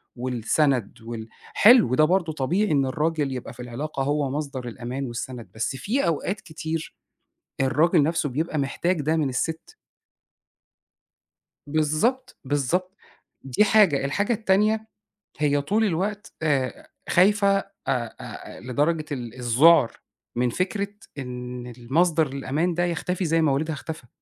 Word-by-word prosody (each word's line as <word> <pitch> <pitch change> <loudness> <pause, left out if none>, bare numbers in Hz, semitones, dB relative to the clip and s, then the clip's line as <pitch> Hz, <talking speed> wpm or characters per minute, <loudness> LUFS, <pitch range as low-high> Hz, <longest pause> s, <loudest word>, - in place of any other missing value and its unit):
والسند 125 0 0
وال 115 -1 -7 0.3
حلو، 215 - +6
ده 155 - +5
برضه 170 -1 +1
طبيعي 170 +9 0
إن 140 -2 +3
الراجل 150 0 0
يبقى 125 -2 -6
في 120 - -20
العلاقة 135 +4 -4
هو 145 0 0
مصدر 140 -3 -4
الأمان 125 +3 -5
والسند، 120 0 -6
بس 115 +4 -2
في 225 - -1
أوقات 175 +5 -1
كتير 160 0 -5 0.7
الراجل 150 +5 +3
نَفْسه 160 0 +1
بيبقى 155 +4 -2
محتاج 165 +5 0
ده 155 +3 +1
من 155 -3 +1
السِت. 160 +5 -3 1.9
بالضبط، 155 - 0
بالضبط، 145 +7 -1 0.5
دي 135 +9 +2
حاجة، 200 -10 +4
الحاجة 205 - 0
التانية، 215 +1 +2 0.5
هي 145 -1 +2
طول 210 +10 +1
الوقت 205 +4 -2
آآ 150 - 0 0.2
خايفة 200 +2 +4
أ - - -5 0.2
أ 125 -4 -1
آآ - - -9
لدرجة 150 +5 0
ال 120 -5 -4
الذُعر 130 +3 +5 0.4
من 125 +1 +1
فكرة 200 - -1 0.3
إن 125 -2 -6
المصدر 155 +7 +1
الأمان 140 +6 -1
ده 175 +1 +1
يختفي 175 +2 -2
زي 165 0 +2
ما 155 -3 +3
والدها 155 +4 0
اختفى، 155 -3 -7
150 Hz, 135 wpm, -25 LUFS, 130-175 Hz, 1.9 s, حلو